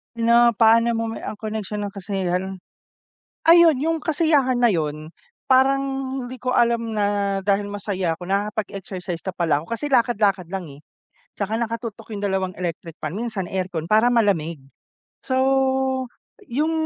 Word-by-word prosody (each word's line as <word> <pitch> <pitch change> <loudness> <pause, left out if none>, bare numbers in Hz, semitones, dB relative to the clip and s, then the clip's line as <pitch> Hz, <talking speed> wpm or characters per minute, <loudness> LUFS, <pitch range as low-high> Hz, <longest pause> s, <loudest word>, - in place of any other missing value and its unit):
Pina 235 +1 +5
paano 230 +1 +4
mo 225 -1 -2
ang 210 - -7
koneksyon 210 -1 -4
ng 200 - -10
kasiyahan? 190 -1 -3 0.9
Ayun 335 -4 +7
yung 325 +3 0
kasiyahan 290 -5 +2
na 240 - +5
yun, 155 -6 -1 0.4
parang 265 +1 +4 0.5
hindi 255 - -7
ko 255 0 -3
alam 235 -2 +2
na 205 -2 0
dahil 200 +1 0
masaya 195 -4 -2
ako 175 +2 -6
nakakapag-exercise 195 -3 -3
na 190 - -3
pala 170 -4 0
ako 165 - -15
kasi 230 +6 -2
lakad-lakad 210 - +2
lang 190 -3 -4
eh. 140 -1 -12 0.6
'Tsaka 215 +3 -2
naka-tutok 230 -1 -5
yung 200 - -3
2 190 -2 -1
electric 170 -2 -5
fan, 155 +2 -5
minsan 220 -3 -3
aircon 185 -4 -3
para 220 +5 +4
malamig. 195 -9 +1 0.7
So, 260 0 +2 1.0
yung 300 +7 0
205 Hz, 140 wpm, -22 LUFS, 190-235 Hz, 1.0 s, Ayun